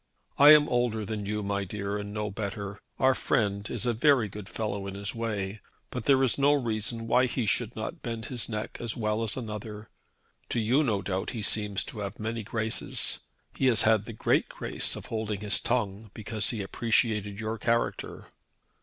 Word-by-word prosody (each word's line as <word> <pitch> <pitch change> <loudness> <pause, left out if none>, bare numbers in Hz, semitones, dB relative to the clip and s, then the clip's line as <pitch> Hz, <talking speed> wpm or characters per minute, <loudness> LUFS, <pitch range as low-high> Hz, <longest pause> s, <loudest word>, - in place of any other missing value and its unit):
I 145 +2 +11
am 150 0 +4
older 120 -5 0
than 105 -1 -4
you, 105 0 -2
my 100 0 -1
dear, 100 +1 -3
and 100 0 -6
know 105 0 -3
better. 100 -1 -5 0.2
Our 130 0 +4
friend 100 -4 0
is 120 -1 -1
a 120 - +2
very 120 -2 +4
good 105 0 -8
fellow 100 -3 -3
in 100 - -6
his 100 +1 -3
way, 105 -3 -3 0.3
but - - -4
there 135 -1 +5
is 130 +1 +2
no 140 +1 +5
reason 115 -3 -1
why 125 +3 +4
he 120 -1 -1
should 110 +2 0
not 110 - -5
bend 115 -2 -4
his 120 -1 -3
neck 105 -1 -4
as 120 -3 -3
well 110 -1 0
as 115 +1 -1
another. 105 -2 -6 0.6
To 120 - 0
you 125 +7 +3
no 105 -8 0
doubt 95 0 -2
he 110 - -3
seems 105 -2 +1
to 110 - -7
have 100 -1 -5
many 110 +1 -3
graces. 110 +1 0 0.3
He 130 - +1
has 120 -4 +5
had 110 -2 +4
the 115 - -7
great 110 - +1
grace - - -1
of - - -8
holding 110 -2 -3
his 105 -1 +3
tongue 110 -3 -1
because 110 -1 -2
he 110 -4 -2
appreciated 105 -1 0
your 110 0 -3
character." 115 +2 -1
110 Hz, 195 wpm, -28 LUFS, 105-115 Hz, 0.6 s, I